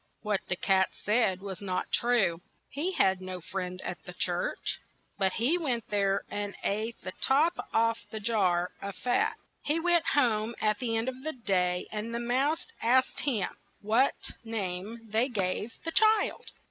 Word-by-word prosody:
What 210 -2 +1
the 180 - 0
cat 190 0 +3
said 210 -4 +1
was 195 -1 -6
not 185 -2 -2
true, 220 -9 +2 0.3
he 325 +8 -2
had 190 - +3
no 185 -1 -5
friend 180 +1 -4
at - - -5
the - - -9
church. - - -1 0.4
But 190 -1 +2
he 280 +10 +3
went 250 -8 -2
there 200 -1 +2
and 205 -1 -3
ate 220 +3 -1
the 185 - -4
top 305 +6 +4 0.2
off 230 0 +2
the 220 - -5
jar 185 -5 +1
of 200 -1 -5
fat. 250 - +1 0.3
He 300 +3 +1
went 345 -1 +3
home 230 -4 +2
at 215 -1 +1
the 230 -3 0
end 225 +2 -1
of 260 0 -4
the 315 +1 -2
day, 180 -6 0
and 220 +2 -3
the - - -1
mouse 265 +7 +1 0.2
asked 255 +3 +3
him 225 -10 0 0.3
what 225 +6 +3 0.3
name 215 0 -4
they 230 +5 +2
gave 205 0 -1
the 330 - -1
child. 435 +2 +3
220 Hz, 170 wpm, -29 LUFS, 195-255 Hz, 0.4 s, top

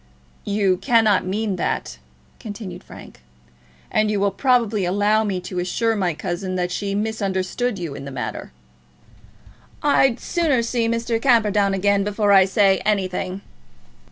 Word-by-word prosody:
"You 200 -2 +1
cannot 220 -3 +2
mean 200 0 -2
that," 65 - -3 0.4
continued 205 -3 -8
Frank, - - -13 0.7
"and 215 0 +2
you 210 -1 0
will 200 0 +1
probably 230 -3 +1
allow 205 +4 +2
me 195 -4 -2
to 180 0 -5
assure 225 +6 0
my 180 -6 -1
cousin 185 +3 -4
that 180 -1 -1
she 200 +2 -3
misunderstood 210 +2 -2
you 170 -5 -5
in 140 0 -8
the - - -6
matter." 135 - -6 1.3
"I'd 270 -4 +3
sooner 300 -9 0
see 230 0 0
Mr. 230 0 -1
Camperdown 210 -6 +3
again 200 +1 +2
before 205 0 0
I 195 -1 +7
say 195 -1 +3
anything." 190 -2 -1
205 Hz, 140 wpm, -21 LUFS, 185-225 Hz, 1.3 s, I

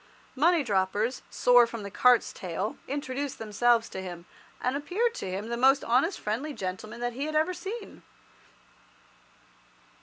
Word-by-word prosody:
Money 325 +3 +3
droppers, 205 +2 0
sore 245 -1 +5
from 230 -2 -7
the 200 - -7
cart's 250 +2 +4
tail, 185 +4 -4
introduced 280 0 -3
themselves 225 +2 +2
to 190 - -6
him, 175 -2 -8 0.3
and 250 +2 -1
appeared 385 +11 0
to 190 - -5
him 200 +4 -4
the 235 - -1
most 270 +3 +4
honest 260 +11 +2
friendly 250 +9 -3
gentlemen 205 +3 -6
that 240 0 -2
he 270 +4 -3
had 310 0 -4
ever 315 +4 +2
seen. 395 +5 -7
245 Hz, 150 wpm, -28 LUFS, 210-290 Hz, 0.3 s, sore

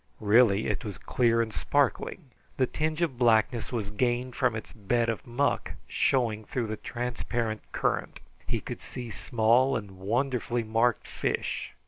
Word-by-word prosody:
Really 105 -1 +5
it 105 -3 -1
was 100 -5 -5
clear 115 -2 +2
and 110 -2 -7
sparkling. 145 - 0 0.3
The 130 - +4
tinge 155 +5 -1
of 135 -7 -2
blackness 115 -2 +3
was 110 -5 -2
gained 125 +3 0
from 125 -4 +2
its 110 - -7
bed 115 +2 0
of 115 +4 -3
muck 130 +4 0
showing 115 -5 +1
through 125 +1 -2
the 110 0 -3
transparent 120 -2 -3
current. - - -1 0.3
He - - -1
could - - -7
see 120 -2 -7
small 120 +5 +3
and 100 -3 -9
wonderfully 120 +3 0
marked 115 +2 +1
fish. - - -2
120 Hz, 150 wpm, -28 LUFS, 110-125 Hz, 0.3 s, Really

